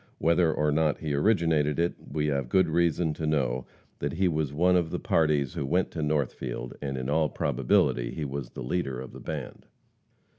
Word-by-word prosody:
Whether 85 0 +3
or 75 -1 +1
not 75 0 +2
he 75 -2 -3
originated 80 -3 +2
it, 85 +1 +1 0.2
we 75 -1 0
have 70 -4 -1
good 95 +5 +4
reason 85 0 +1
to 80 0 -3
know 65 -5 0 0.3
that - - -2
he 95 +3 +2
was 80 -4 0
one 90 +5 +3
of 85 -2 +2
the - - -2
parties 75 -4 +1
who - - -3
went 90 +7 0
to 80 - -4
Northfield, 65 -5 -2
and 70 -2 -3
in 65 0 -3
all 75 +1 +2
probability 60 -4 +1
he 75 +2 -4
was 70 -2 -5
the 65 - -7
leader 65 -2 -2
of 65 - -8
the - - -10
band. - - -6
75 Hz, 195 wpm, -28 LUFS, 70-80 Hz, 0.3 s, good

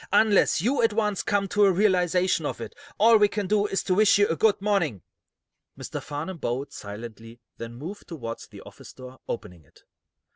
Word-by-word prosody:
"Unless 205 -4 +3
you 250 +3 +1
at 225 -2 +2
once 210 -3 0
come 200 -2 0
to 205 +1 +3
a 195 - +5
realization 185 -2 +2
of - - -4
it, - - -7 0.2
all 225 +2 +6
we 210 -1 +5
can 205 0 -3
do 210 +2 +1
is 195 - -2
to 185 - 0
wish 205 +2 +5
you 205 - +4
good 215 +3 +2
morning." 185 - 0 0.7
Mr. - - -6
Farnum 160 +5 -6
bowed, 135 +2 -3
silently, 115 +2 -9 0.2
then 115 0 -8
moved 170 +11 -8
toward 115 -9 -6
the - - -12
office - - -13
door, 130 0 -12
opening 90 -7 -6
it. 65 - -25
185 Hz, 185 wpm, -25 LUFS, 125-205 Hz, 0.7 s, all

